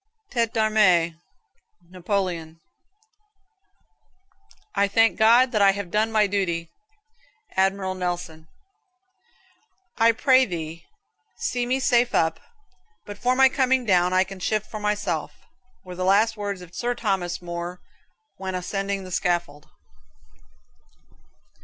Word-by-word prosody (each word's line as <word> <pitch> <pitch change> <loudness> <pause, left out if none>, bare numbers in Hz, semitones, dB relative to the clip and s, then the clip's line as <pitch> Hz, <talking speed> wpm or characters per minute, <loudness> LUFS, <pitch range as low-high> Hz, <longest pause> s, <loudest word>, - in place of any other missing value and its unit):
"Tete 230 -3 0
d'armee." 210 -7 +3 0.8
Napoleon. 180 -3 -3 2.1
"I 200 - +2
thank 225 +3 +3
God 235 +4 +5
that 215 -4 +1
I 195 -1 +6
have 200 -3 -6
done 215 +3 +1
my 215 -1 +3
duty." 180 -5 -2 0.8
Admiral 190 0 +1
Nelson. 175 -3 -5 1.5
"I 230 +1 +6
pray 260 +2 +4
thee 170 -3 -6 0.5
see 245 -1 -2
me 260 +2 0
safe 245 -2 +2
up, 165 0 +1 0.7
but 205 0 -9
for 250 +1 +1
my 265 0 +6
coming 260 -1 +1
down 180 -3 +3
I 185 0 +4
can 195 0 -10
shift 215 +3 -2
for 215 - -5
myself," 210 0 -2 0.5
were 180 - -8
the 185 +1 -4
last 210 +4 +3
words 200 -3 -4
of 175 -1 -13
Sir 245 +4 -2
Thomas 190 -6 -2
More 175 +1 -6 0.6
when 190 -1 -5
ascending 195 +2 -3
the 185 - -10
scaffold. 175 -5 -2
195 Hz, 120 wpm, -24 LUFS, 180-225 Hz, 2.1 s, I